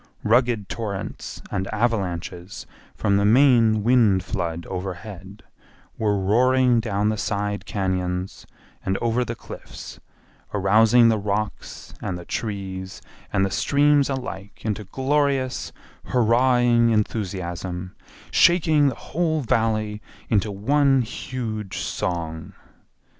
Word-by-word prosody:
Rugged 120 -2 +2
torrents 100 -3 -5
and 95 0 -2
avalanches 95 -5 -2 0.3
from 100 0 +1
the 100 - +2
main 115 -2 +5
wind 110 -6 +4
flood 85 -4 -3
overhead 95 +1 -7 0.5
were 105 -2 +1
roaring 125 +5 +3
down 105 -2 0
the 110 -1 -2
side 105 0 -2
cañons 95 -1 -2 0.4
and 95 +1 0
over 120 +1 0
the - - -5
cliffs, - - -10 0.6
arousing 110 +4 +5
the 110 -1 +2
rocks 105 +1 -4
and 90 - -3
the 85 - -10
trees 95 -3 -5 0.3
and 95 - +2
the 95 - -3
streams 145 +3 +3
alike 115 -8 -6
into 105 -1 -2
glorious 135 +2 0 0.3
hurrahing 120 0 +3
enthusiasm, 90 -4 -2 0.4
shaking 160 -4 +4
the 130 - 0
whole 160 -1 -1
Valley 110 -3 0 0.3
into 105 -1 +2
one 135 +6 +2
huge 110 -4 -5
song. 80 -2 -3
110 Hz, 110 wpm, -23 LUFS, 95-120 Hz, 0.6 s, main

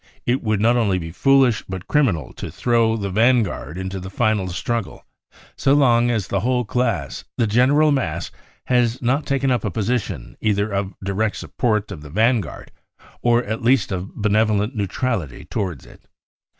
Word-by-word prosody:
It 125 +2 +1
would 110 -2 0
be 100 - -1
not 120 +2 +4
only 95 -8 0
foolish, 135 +1 +3
but 95 -1 -6
criminal, 105 - +1
to - - -7
throw 115 -2 +1
the 100 -2 -3
vanguard 110 - +1
into 95 0 -4
the 95 +1 -7
final 110 -2 0
struggle 115 +4 -4 0.5
so 135 - +2
long 120 -4 +4
as, 110 -5 0
the 100 - 0
whole 125 +3 0
class, 115 - -1
the 115 - +2
general 135 +8 +4
mass, 85 - -2 0.3
has 125 -1 +2
not 135 +5 +1
taken 135 -1 +1
up 125 - 0
a 105 - -1
position 105 - -3
either 105 -1 +1
of 100 0 -2
direct 105 +2 -1
support 105 -4 -1
of 85 -6 -7
the 75 - -11
vanguard 110 - 0 0.5
or 120 0 +3
at 110 +1 -4
least 120 -2 +2
of 95 0 -5
benevolent 105 +2 +1
neutrality 100 - -2
towards 90 - -4
it. - - -16
110 Hz, 165 wpm, -21 LUFS, 95-125 Hz, 0.5 s, not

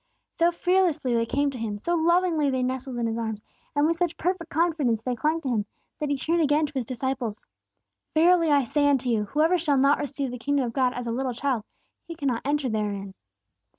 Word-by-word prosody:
So 340 +1 +3
fearlessly 345 -7 +1
they 230 0 +1
came 285 +3 +1
to 255 - -7
Him, 215 -2 -3
so 340 +12 -2
lovingly 340 -2 +2
they 260 -1 0
nestled 260 0 -3
in 235 - -1
His 225 0 -2
arms, 220 -2 -4 0.3
and 290 +1 +3
with 330 +1 +1
such 345 -1 -1
perfect 350 -1 -2
confidence 295 -9 +1
they 250 - -1
clung 310 +7 0
to 270 - -3
Him, 215 -4 0 0.3
that 300 - -2
He 285 - 0
turned 330 +5 +1
again 300 0 +3
to 295 - -8
His 260 -4 -2
disciples. 255 -3 -3 0.7
"Verily 335 +1 +5
I 285 -2 +4
say 285 +4 +2
unto 260 -3 +1
you, 215 -3 +1
Whosoever 315 - +2
shall 300 -4 +1
not 275 +2 +4
receive 280 -2 -3
the 250 - -6
kingdom 280 +1 0
of 230 - -4
God 255 -2 +2
as 245 0 -4
a 230 - -2
little 255 +1 -2
child, 245 -4 -1 0.4
he 335 - -6
shall 280 -3 0
not 235 -2 -1
enter 290 -1 0
therein." 205 -3 -3
275 Hz, 220 wpm, -26 LUFS, 240-315 Hz, 0.7 s, Verily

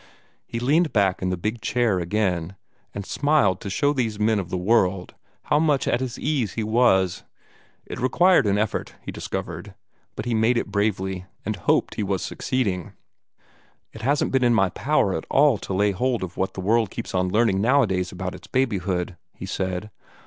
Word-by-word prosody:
He 115 - -4
leaned 155 +7 +2
back 100 -4 +1
in 90 - 0
the 90 - -1
big 110 +6 -3
chair 115 -6 +1
again, 90 -1 -1 0.4
and 100 - -6
smiled 140 - +2
to 100 - -5
show 145 +9 +1
these 115 -6 -1
men 110 0 +2
of 90 -3 -5
the 90 - -2
world 95 -2 +1 0.3
how 150 - +2
much 150 -4 +2
at 120 - +2
his 130 -2 -4
ease 135 -10 -1
he 115 - -2
was. 105 -5 +2 0.6
It - - -7
required 175 - +4
an 100 0 +2
effort, 105 0 -2
he - - -6
discovered, - - -6 0.4
but - - -5
he 120 - -1
made 115 +2 +3
it 105 - -2
bravely, 95 -3 -1 0.2
and 110 +1 -1
hoped 90 - +1
he - - -3
was 95 -3 -1
succeeding. 100 -9 -2 1.0
"It 110 - -10
hasn't 140 +5 +1
been 130 -1 +2
in 120 -1 +4
my 95 -4 +3
power 140 - +1
to - - -1
at - - -12
all 140 -6 +4
lay 100 +2 +2
hold 120 +3 -1
of 90 -1 -6
what 95 0 -2
the 95 - -4
world 110 +2 +2
keeps - - -6
on 90 0 +1
learning 105 -1 +2
nowadays 105 -7 +2
about - - -5
its - - -12
babyhood," 95 -8 -1 0.2
he - - -7
said. 95 +2 -3
105 Hz, 190 wpm, -24 LUFS, 95-125 Hz, 1.0 s, required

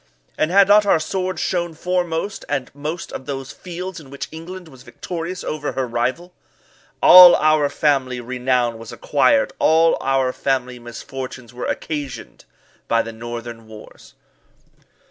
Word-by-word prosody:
And 155 - 0
had 195 +2 +5
not 210 +1 +6
our 195 - +5
swords 185 +4 -3
shone 175 -2 -2
foremost 180 +2 -2
at 130 - -3
most 150 +4 -6
of 130 - -8
those 135 -1 -5
fields 180 0 -7
in 145 -4 -14
which 140 +1 -7
England 175 +3 -9
was 130 -5 -15
victorious 170 +8 -6
over 150 -1 -4
her 130 - -1
rival? 130 +10 -2 0.7
All 180 -1 +10
our 155 -2 +3
family 135 -4 0
renown 125 -1 -1
was 115 -1 -10
acquired 275 - +1
all 160 +1 +4
our 135 -1 +1
family 125 -2 -2
misfortunes 120 0 -8
were 125 - -5
occasioned 140 -6 -5 0.4
by 115 0 +2
the 115 - -8
northern 115 0 -8
wars. 110 -1 -14
140 Hz, 145 wpm, -20 LUFS, 125-170 Hz, 0.7 s, All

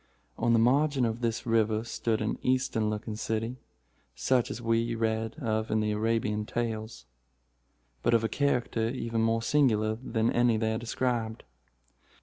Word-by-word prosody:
On 120 +1 +1
the - - +5
margin 135 +3 +3
of 115 +1 -2
this 115 -1 -1
river 110 -1 +2
stood 115 -1 -1
an 110 - -2
Eastern 125 -4 +1
looking 105 0 -4
city, 115 +3 -2 0.6
such 115 - +1
as - - -5
we 115 0 0
read 110 0 -1
of 110 -7 -2
in 110 - +1
the 105 0 0
Arabian 105 0 0
Tales, 110 - -4 1.0
but 120 - +3
of 115 - +2
a - - +2
character 120 -3 0
even 115 -2 -2
more 115 0 +1
singular 110 -6 +2
than 115 -2 0
any 120 -2 +3
there 110 0 0
described. 115 -1 -2
115 Hz, 150 wpm, -29 LUFS, 110-120 Hz, 1.0 s, the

